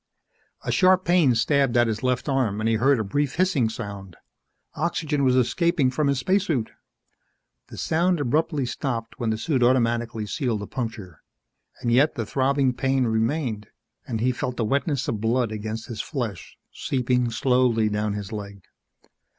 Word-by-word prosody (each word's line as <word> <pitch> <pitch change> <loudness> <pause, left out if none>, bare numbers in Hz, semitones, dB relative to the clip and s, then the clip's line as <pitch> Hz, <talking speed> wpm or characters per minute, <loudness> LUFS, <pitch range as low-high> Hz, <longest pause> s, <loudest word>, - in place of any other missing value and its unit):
A - - -2
sharp 185 0 +4
pain 170 -8 +4
stabbed 135 +1 +2
at 120 - +5
his 110 -1 -2
left 125 +1 -1
arm 130 -7 0
and 110 - 0
he 115 -1 +2
heard 135 +4 +3
a - - 0
brief 145 +7 -1
hissing 165 -10 +2
sound. 100 -5 -7 0.6
Oxygen 155 -2 -1
was 130 -1 +3
escaping 135 +2 +2
from 145 +3 0
his 140 -1 +1
spacesuit. 165 - 0 1.0
The - - -11
sound 175 +2 +1
abruptly 145 +1 0
stopped 120 -2 -4
when 115 - -1
the 110 - 0
suit 135 +2 -1
automatically 120 -3 +1
sealed 115 -2 -2
the - - -4
puncture. 110 - -6 0.6
And 120 - 0
yet 140 +6 +4
the 115 - -3
throbbing 135 +2 +1
pain 135 +1 +1
remained 110 -1 -1 0.4
and 115 -3 -3
he 125 +2 +2
felt 125 0 -4
the 115 - 0
wetness 140 - 0
of 110 -2 -2
blood 115 0 +1
against 110 +1 -5
his 115 -4 -5
flesh, 115 - -5 0.2
seeping 125 -2 0
slowly 120 -2 +2
down 105 0 -1
his 105 0 -6
leg. 100 -3 -7
125 Hz, 165 wpm, -24 LUFS, 110-140 Hz, 1.0 s, at